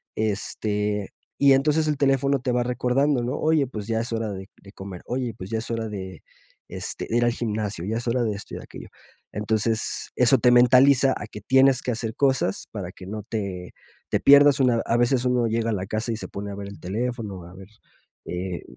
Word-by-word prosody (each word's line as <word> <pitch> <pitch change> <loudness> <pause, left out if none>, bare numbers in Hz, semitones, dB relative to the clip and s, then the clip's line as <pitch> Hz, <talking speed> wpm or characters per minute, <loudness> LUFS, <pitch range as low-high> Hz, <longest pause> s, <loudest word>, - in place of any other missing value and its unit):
este, 105 -1 -2 0.3
y 140 -1 +6
entonces 150 +3 +2
el 150 -2 0
teléfono 140 0 +2
te 125 0 -2
va 125 0 +1
recordando, 125 +2 +1
¿no? 125 - -2
Oye, 155 -2 +2
pues 105 -5 -6
ya 115 -1 0
es 115 +1 -4
hora 115 -2 -2
de 95 0 -8
de 100 - -14
comer, 95 -3 -9
oye, 125 -2 -3
pues 95 +3 -8
ya 110 - 0
es 115 - -7
hora 115 -1 -2
de, 95 -4 -7 0.4
este, - - -5
de 115 - +1
ir 120 - +3
al 120 - +3
gimnasio, 105 -6 -3
ya 110 +3 -2
es 120 - -5
hora 120 +1 +1
de 110 - 0
esto 100 - -8
y - - -5
de - - -9
aquello. - - -11 0.4
Entonces, 110 +1 -1
eso 125 +1 +4
te 125 - +4
mentaliza 130 +2 +6
a 105 - -6
que 105 - -9
tienes 130 +3 +4
que 125 - -1
hacer 115 -1 -4
cosas 130 -9 0
para 95 -5 -6
que 95 - -12
no 105 +2 -5
te 100 -5 -5 0.4
te - - +1
pierdas 145 0 +7
una 125 -3 +3
a 115 - +1
veces 120 +1 +2
uno 125 -1 +2
llega 115 +1 0
a - - 0
la 95 -1 -3
casa 110 +3 -3
y 110 - -2
se - - -7
pone 100 +1 -6
a 100 - -6
ver 100 0 -7
el 100 - -10
teléfono, 105 -2 -4
a 90 - -13
ver, 95 0 -12 0.6
eh, 90 0 -4
115 Hz, 225 wpm, -24 LUFS, 105-125 Hz, 0.6 s, pierdas